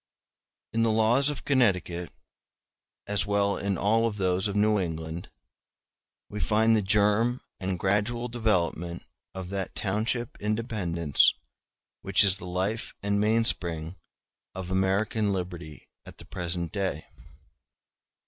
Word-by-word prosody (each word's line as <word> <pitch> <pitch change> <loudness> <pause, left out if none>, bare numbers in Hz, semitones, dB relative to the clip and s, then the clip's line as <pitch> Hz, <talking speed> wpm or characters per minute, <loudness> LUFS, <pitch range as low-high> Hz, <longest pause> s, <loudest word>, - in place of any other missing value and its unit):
] - - -63
In 115 - +1
the 115 - +3
laws 115 +6 +3
of 145 - -6
Connecticut, 90 - +1 0.9
as 100 -2 +1
well 100 0 +1
as - - -7
in 100 -2 0
all 110 +5 +2
those 95 -2 0
of 100 - -4
New 105 0 +3
England, 80 -1 -5 1.0
we 105 - -7
find 110 +2 +3
the 110 - +2
germ 105 +5 +2 0.2
and 95 -1 -2
gradual 105 +6 0
development 90 -7 -1 0.3
of 95 -1 -6
that 95 -2 -4
township 110 +4 -2
independence 100 - +1 0.7
which 100 +1 +5
is 95 -2 +5
the 90 - -9
life 95 +6 -2
and 100 0 +1
mainspring 95 -7 +2 0.6
of 95 -1 -6
American 100 +3 +1
liberty 90 -5 -6 0.2
at - - -12
the - - -11
present 85 -1 -3
day. 95 -7 -2
100 Hz, 130 wpm, -27 LUFS, 90-110 Hz, 1.0 s, which